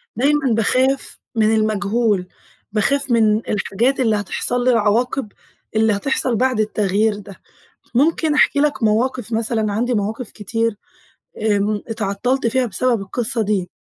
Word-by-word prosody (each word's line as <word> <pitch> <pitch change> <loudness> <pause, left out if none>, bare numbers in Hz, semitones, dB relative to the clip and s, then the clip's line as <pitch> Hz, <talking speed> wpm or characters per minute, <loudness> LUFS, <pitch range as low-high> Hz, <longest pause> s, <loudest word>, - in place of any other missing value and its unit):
دايمًا 275 +1 +2
باخاف 255 +5 +1 0.2
من 220 -1 +3
المجهول، 215 -2 0 0.4
باخاف 270 +6 0
من 220 -2 +4
الحاجات 225 +6 0
اللي 225 -4 +2
هتحصل 240 +4 -1
لي، 255 - +3
العواقب 230 +1 +1 0.4
اللي 220 0 +3
هتحصل 250 +3 0
بعد 255 0 +1
التغيير 210 0 +1
ده، 200 -2 -12 0.5
ممكن 310 +3 +2
أحكي 290 - +3
لك 290 -4 0
مواقف 235 +2 0
مثلًا 220 -1 0
عندي 240 +4 0
مواقف 220 +2 -3
كتير 225 +1 -2 0.7
آمم 210 -1 +1
اتعطّلْت 225 +4 -1
فيها 255 +2 +1
بسبب 235 +1 0
القِصّة 230 +4 -2
دي. 200 -4 -1
225 Hz, 130 wpm, -19 LUFS, 210-255 Hz, 0.7 s, من